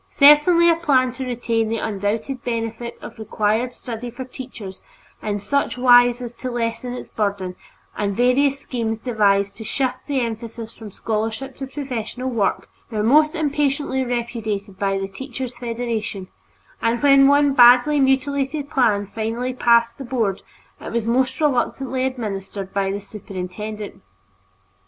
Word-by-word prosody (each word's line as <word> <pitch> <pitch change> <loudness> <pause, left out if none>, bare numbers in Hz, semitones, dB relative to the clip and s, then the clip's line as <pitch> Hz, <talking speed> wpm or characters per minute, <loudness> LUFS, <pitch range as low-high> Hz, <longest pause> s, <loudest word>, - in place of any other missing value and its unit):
Certainly 300 +4 +6
a 330 - +1
plan 265 -6 +2
to 260 +1 -6
retain 230 -2 -1
the 225 - -1
undoubted 220 +5 -2
benefit 230 0 -4
of 230 - -10
required 220 +3 0
study 240 0 -6
for 245 +2 -7
teachers 245 -7 -9 0.4
in 205 -1 -2
such 280 +7 -1
wise 245 0 +5
as 240 -1 -6
to 255 - -4
lessen 240 +1 -3
its 250 - -8
burden, 200 -4 -2 0.4
and 200 -2 -2
various 265 +3 +3
schemes 230 -5 -3
devised 200 -4 +1
to 225 - -7
shift 255 +3 -1
the 280 -2 0
emphasis 230 -1 -5
from 220 -2 -10
scholarship 225 +6 -3
to 270 - -5
professional 255 -2 -4
work, 215 -5 0 0.2
were 215 -3 -2
mostly 305 +7 +4
impatiently 285 -2 0
repudiated 225 -5 -3
by 195 -2 +1
the 195 0 -3
Teachers' 255 +4 -7
Federation, 230 -5 -4 0.5
and 230 +2 0
when 275 -1 +7
one 285 0 +4
badly 250 +3 +7
mutilated 275 +1 0
plan 215 -6 +2
finally 225 +5 -3
passed 235 -1 +3
the - - -5
Board, 230 -6 -1 0.4
it - - -7
was 230 -1 -1
most 255 +3 +1
reluctantly 265 -2 0
administered 200 -5 -5
by 195 -1 0
the 200 - -3
superintendent. 205 +1 -7
240 Hz, 145 wpm, -21 LUFS, 215-265 Hz, 0.5 s, when